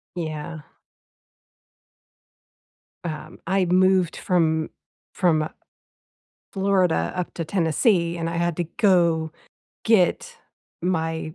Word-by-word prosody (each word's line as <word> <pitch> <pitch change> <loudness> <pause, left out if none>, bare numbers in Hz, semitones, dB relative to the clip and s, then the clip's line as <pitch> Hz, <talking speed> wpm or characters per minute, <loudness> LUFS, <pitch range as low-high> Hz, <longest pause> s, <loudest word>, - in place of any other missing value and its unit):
Yeah. 155 -2 -5 2.4
Um, 155 0 -6
I 190 0 +2
moved 185 0 +3
from 160 -3 +1 0.4
from 160 -4 +1 1.0
Florida 190 -3 +1
up 180 -1 -3
to 165 - -3
Tennessee, 170 - +1
and 165 0 -2
I 170 - -3
had 170 -1 0
to 175 - -1
go 170 -6 +3 0.5
get 210 -6 +2 0.4
my 160 -3 -2
170 Hz, 90 wpm, -23 LUFS, 160-185 Hz, 2.4 s, moved